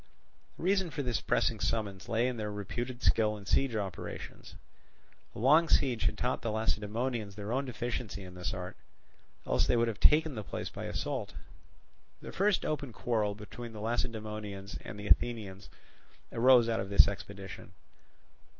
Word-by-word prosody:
The - - -8
reason 190 -1 +2
for 145 -1 -3
this 120 -4 -1
pressing 115 -3 +1
summons 105 -3 -2
lay 115 +2 +2
in 125 -2 -2
their 105 -1 -3
reputed 120 +5 -4
skill 105 -1 +3
in 100 - -11
siege 135 +3 +2
operations; 100 -4 -5 0.8
a - - -7
long 155 +8 +5
siege 125 -5 +3
had - - +1
taught 125 - 0
the 115 - -2
Lacedaemonians 110 0 -1
their 105 +1 -5
own 135 +3 0
deficiency 120 -5 -4
in 90 -1 -10
this 90 -1 -3
art, 90 0 -5 0.7
else - - +2
they - - +3
would 115 0 +3
have 110 -2 -3
taken 155 0 +5
the 110 -4 -4
place - - -4
by - - -6
assault. - - -3 0.8
The - - -8
first 200 0 +2
open 145 -4 -2
quarrel 110 -2 0
between 115 +3 -8
the 110 - -7
Lacedaemonians 110 -3 -3
and 105 - -8
Athenians 105 -2 +1 0.6
arose 120 0 +6
out 115 -1 +1
of 95 - -3
this 100 - +7
expedition. 100 -2 -7
110 Hz, 160 wpm, -31 LUFS, 100-125 Hz, 0.8 s, this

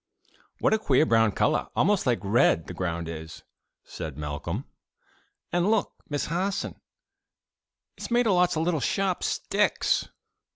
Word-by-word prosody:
'" - - -34
"What - - +3
a 220 - +3
queer 145 -6 +3
brown 115 -5 +4
color - - +1
almost 200 -6 +2
like 120 - +3
red 100 -5 +3
the - - -7
ground 85 -2 -3
is!" 80 0 -8 0.4
said 75 -3 -7
Malcolm. 75 -1 -4 0.9
"And 175 +3 +2
look, 220 -2 +1 0.2
Miss 145 -1 -1
Harson! 185 +4 -2 1.1
it's - - -7
made 240 0 +3
of 210 - +3
lots 180 -1 +3
of 160 - 0
little 165 -2 +1
sharp 195 +3 0
sticks." 210 +1 +1
155 Hz, 150 wpm, -26 LUFS, -, 1.1 s, brown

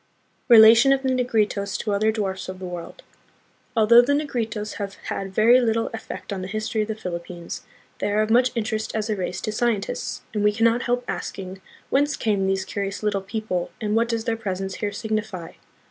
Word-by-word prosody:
Relation 230 +2 +8
of 270 0 +2
the 265 - +1
Negritos 215 -6 0
to 215 - -3
Other 215 +2 +2
Dwarfs 190 -4 -3
of 185 - -6
the 185 - -7
World. 175 -2 -8 0.7
Although 230 +2 +7
the 265 +4 +1
Negritos 225 -8 -2
have 200 -1 -5
had 195 -1 -3
very 235 +6 +5
little 225 -1 0
ef 225 - -5
fect - - -6
on 190 - -4
the 185 - -5
history 215 +2 -2
of 210 - -2
the 220 - -3
Philippines, 175 -3 -6 0.4
they 205 - -1
are 210 +1 +3
of 215 - -2
much 250 +2 +5
interest 220 -1 -2
as 220 0 -1
a - - +1
race 185 -1 -3
to 215 - -2
scientists, 215 -2 -2
and 210 -2 0
we 210 0 +4
can 225 +2 -1
not 230 +1 +4
help 245 0 -1
asking, 190 0 -5 0.3
Whence 285 +1 +2
came 200 -3 0
these 190 0 0
curious 200 +1 -4
little 205 -2 0
people, 195 -3 -3
and 210 0 -1
what 230 +1 +2
does 230 -1 -1
their 230 -1 0
presence 195 -3 -4
here 205 -1 -2
signify? 215 -5 -4
215 Hz, 205 wpm, -24 LUFS, 195-230 Hz, 0.7 s, Relation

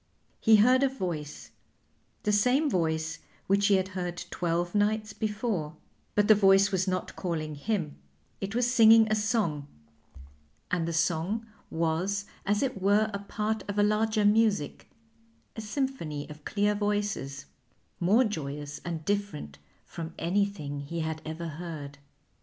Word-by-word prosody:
He 220 -1 +6
heard 250 +5 +5
a 275 - +4
voice, 170 - -5 0.7
the 210 - +1
same 250 +8 +3
voice 160 -1 -1 0.3
which 200 +1 +3
he 200 - +5
had 190 0 0
heard 180 -2 -4
twelve 175 0 -1
nights 210 0 +1
before; 210 -8 -2 0.4
but 205 0 +3
the 215 - +9
voice 195 -1 +5
was 190 0 0
not 185 -1 -2
calling 155 -4 -3
him, 160 0 -2 0.4
it 195 +2 -4
was 245 0 +2
singing 225 -2 +7
a - - +4
song, 205 - 0 1.0
and 170 -2 0
the - - -1
song 165 +7 0 0.2
was 170 +5 -1 0.2
as 205 +3 +2
it 250 -8 -2
were 210 +3 +3
a 200 - -2
part 215 +2 -3
of 200 - -3
a 205 - +4
larger 215 0 +2
music, 205 -7 +2 0.7
a 220 - -5
symphony 210 - -3
of 150 0 -13
clear 205 0 +1
voices, 205 -10 -2 0.5
more 205 +8 +4
joyous 145 - -4
and 165 -3 -5
different 200 - -3 0.3
from 165 0 -7
anything 170 -5 -1
he 165 +4 -4
had 160 0 -3
ever 160 +2 -5
heard. 155 -3 -7
195 Hz, 145 wpm, -28 LUFS, 160-210 Hz, 1.0 s, the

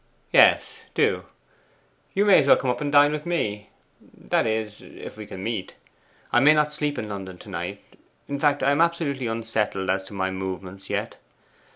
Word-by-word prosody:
'Yes, - - +4
do. - - +1 0.9
You 200 +2 +3
may 200 -2 +7
as 140 - +1
well - - +7
come 125 -2 0
and 145 -1 -2
dine 145 0 +6
with 150 0 -3
me; 105 -12 -2 0.3
that - - -2
is, 110 -1 -3
if - - -11
we 105 -1 -9
can 95 - -8
meet. 110 -4 -4 0.6
I - - +5
may 150 +4 +6
not 150 0 +2
sleep 150 -1 -1
in 110 - -4
London 95 -3 -7
to - - -13
night; - - -5 0.4
in 140 0 -4
fact, 145 -1 +2
I 140 - +4
am 145 +3 +2
absolutely 160 -7 0
unsettled 110 -4 -1
as 95 0 -1
to 100 - -11
my 95 -1 -1
movements 95 0 -6
yet. - - -3
115 Hz, 185 wpm, -24 LUFS, 100-145 Hz, 0.9 s, may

